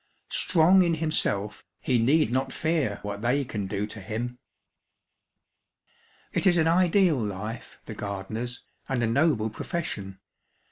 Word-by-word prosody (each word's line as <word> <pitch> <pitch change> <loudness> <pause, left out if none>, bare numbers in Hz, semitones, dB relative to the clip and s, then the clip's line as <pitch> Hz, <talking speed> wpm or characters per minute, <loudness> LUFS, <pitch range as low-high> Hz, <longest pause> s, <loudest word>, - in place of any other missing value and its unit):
Strong 180 +2 +4
in 170 -2 +2
himself, 105 -10 -1 0.2
he 125 -3 +1
need 135 +2 +3
not 130 +1 0
fear 155 -11 0
what 100 0 -5
they 130 +4 +1
can 105 -5 -4
do 100 +2 -2
to 105 0 -9
him. 120 +5 -4 1.9
It - - +2
is 175 -2 +5
an 160 -1 +3
ideal 175 -2 +4
life, 105 +3 -6
the - - -7
gardener's, 110 +5 -5 0.3
and 130 -3 0
a - - +3
noble 115 -2 +2
profession. 105 - -4
125 Hz, 135 wpm, -27 LUFS, 105-160 Hz, 1.9 s, is